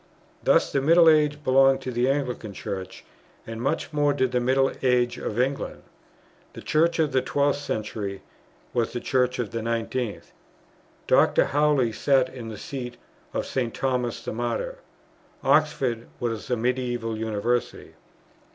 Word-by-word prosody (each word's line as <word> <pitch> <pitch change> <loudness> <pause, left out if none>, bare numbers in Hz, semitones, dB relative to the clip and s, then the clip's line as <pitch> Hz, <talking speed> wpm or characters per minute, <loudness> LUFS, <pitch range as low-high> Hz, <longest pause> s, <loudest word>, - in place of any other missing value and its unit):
Thus, - - +3
the 140 - +1
middle 165 +4 +6
age 150 -1 +4
belonged 135 0 +4
to 130 - -4
the 120 +2 +1
Anglican 125 -6 -2
Church, 95 -1 -6 0.4
and 115 0 -6
much 150 +4 -2
more 145 -1 +2
did 130 -2 0
the 125 - +1
middle 135 +2 +2
age 125 -2 +2
of 110 - -3
England. 135 +2 -1 0.7
The - - -10
Church 165 +2 +2
of 155 -3 +1
the 130 0 +2
12th 140 +2 +1
century 105 -5 -4 0.5
was 120 -2 0
the 120 - -2
Church 125 0 +1
of 115 -5 -3
the 115 - -3
19th. 115 0 -3 0.7
Dr. - - +4
Howley 145 -5 +2
sat 130 +3 +2
in 120 -3 -7
the 110 - -7
seat 125 -4 -6 0.3
of - - -2
St. 120 -4 -2
Thomas 125 -3 -1
the - - -3
Martyr; 120 - -3 0.6
Oxford 135 -6 +2
was 115 -3 -3
a 125 - +1
medieval 120 -1 -1
University. 110 +2 -2
125 Hz, 150 wpm, -25 LUFS, 115-140 Hz, 0.7 s, middle